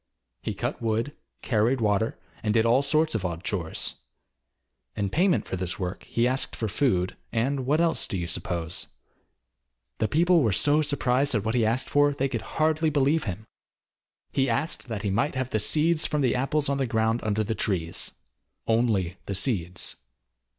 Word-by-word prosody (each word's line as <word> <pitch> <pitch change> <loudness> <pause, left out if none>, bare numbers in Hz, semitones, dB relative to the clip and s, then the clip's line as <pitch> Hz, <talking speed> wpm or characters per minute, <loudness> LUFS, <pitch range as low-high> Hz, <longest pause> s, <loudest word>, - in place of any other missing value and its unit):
He - - -3
cut - - -3
wood, 115 +5 -1 0.3
carried 115 +2 +2
water, 110 0 +1 0.2
and 105 0 0
did 115 0 +4
all 120 +4 +4
sorts 155 +3 +2
of 110 - -1
odd 85 -1 -3
chores. 85 -7 -3 1.0
In 100 -2 -2
payment 180 +2 +2
for - - -4
this 90 -1 -2
work 90 -1 -4
he 120 +1 +1
asked 130 +1 -1
for 110 - -2
food, 100 -6 +1 0.2
and 130 +3 0
what 150 +3 +3
else 170 -1 +1
do 95 - -3
you 85 - -2
suppose? 85 0 -3 1.1
The 110 - +2
people 170 +4 +4
were 115 -6 +2
so 150 +9 +3
surprised 140 -2 +1
at 105 -1 0
what 110 - 0
he 120 -2 +2
asked 115 +4 +1
for 145 0 +3
they 135 -1 0
could 115 -4 -3 0.2
hardly 155 0 +2
believe 145 +1 +2
him. 105 +1 -5 0.9
He 135 -1 +1
asked 135 +5 -2
that 110 -4 -4
he 100 - 0
might 115 +9 0
have 130 -1 -2
the 110 - +1
seeds 155 - +3
from 150 -2 0
the 130 -3 +2
apples 140 +3 0
on 140 0 0
the 135 - 0
ground 110 0 +1
under 110 0 0
the 110 +2 -2
trees 90 -7 0 0.5
only 110 -6 +1
the 100 - -1
seeds. 95 -4 0
115 Hz, 180 wpm, -26 LUFS, 105-140 Hz, 1.1 s, did